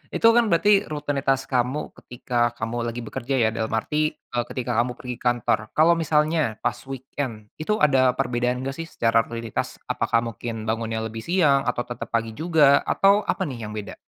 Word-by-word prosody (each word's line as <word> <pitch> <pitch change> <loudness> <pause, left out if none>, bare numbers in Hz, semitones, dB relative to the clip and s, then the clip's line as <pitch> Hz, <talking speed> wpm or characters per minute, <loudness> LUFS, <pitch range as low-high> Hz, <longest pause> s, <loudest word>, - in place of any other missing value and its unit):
itu, - - -3
kan, 230 -1 +4
berarti 205 +3 +3
rutinitas 140 -3 -1
kamu 130 +2 -1
ketika 120 -1 -2
kamu 120 +1 -3
lagi 115 +1 -4
bekerja, 125 +4 -3
ya, 115 -3 +3
dalam 110 0 -2
arti, 155 +7 0
eee, 120 -1 -4
ketika 125 -1 -4
kamu 125 0 0
pergi 125 -1 -7
kantor. 120 -3 +1 0.2
Kalau 160 +2 +5
misalnya 155 -5 +1
pas - - -1
weekend, 130 -5 -6
itu 210 +7 0
ada 130 -7 +3
perbedaan 125 -1 -1
nggak, 135 - -2
sih, 165 - -4
secara 115 -5 +1
rutinitas? 115 -1 -4 0.2
Apakah 115 0 +1
mungkin 115 0 -5
bangunnya 110 0 -2
lebih 110 0 -5
siang 145 -3 +2
atau 125 0 0
tetap 120 -1 -7
pagi 115 -1 0
juga, 150 +1 +4
atau 200 +2 +3
apa, 190 - 0
nih, 120 - -5
yang 105 - -7
beda? 105 -1 -6
125 Hz, 180 wpm, -24 LUFS, 115-150 Hz, 0.2 s, Kalau